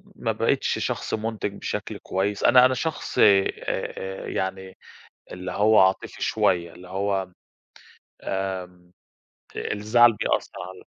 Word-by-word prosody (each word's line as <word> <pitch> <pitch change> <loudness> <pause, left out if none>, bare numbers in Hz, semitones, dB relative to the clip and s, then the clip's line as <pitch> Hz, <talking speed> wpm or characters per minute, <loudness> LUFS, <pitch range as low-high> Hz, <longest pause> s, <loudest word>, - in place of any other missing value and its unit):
ما - - -1
بقتش - - 0
شخص - - -3
منتج 110 -2 -3
بشكل - - -5
كويس، 100 +2 -2
أنا 125 0 +7
أنا 130 - +3
شخص 160 +4 -4
آآ 100 -2 +6 0.2
آآ 95 0 -4
يعني 95 0 -4 0.5
اللي 90 0 -6
هو 105 +3 +4
عاطفي 95 0 +1
شوية، 85 -2 +1
اللي 90 +1 -13
هو 95 -1 -2 0.9
آمم، 90 -2 -4 0.7
الزعل 115 +3 +3
بيأثر - - -1 0.2
على 95 0 -12
95 Hz, 120 wpm, -24 LUFS, 95-105 Hz, 0.9 s, أنا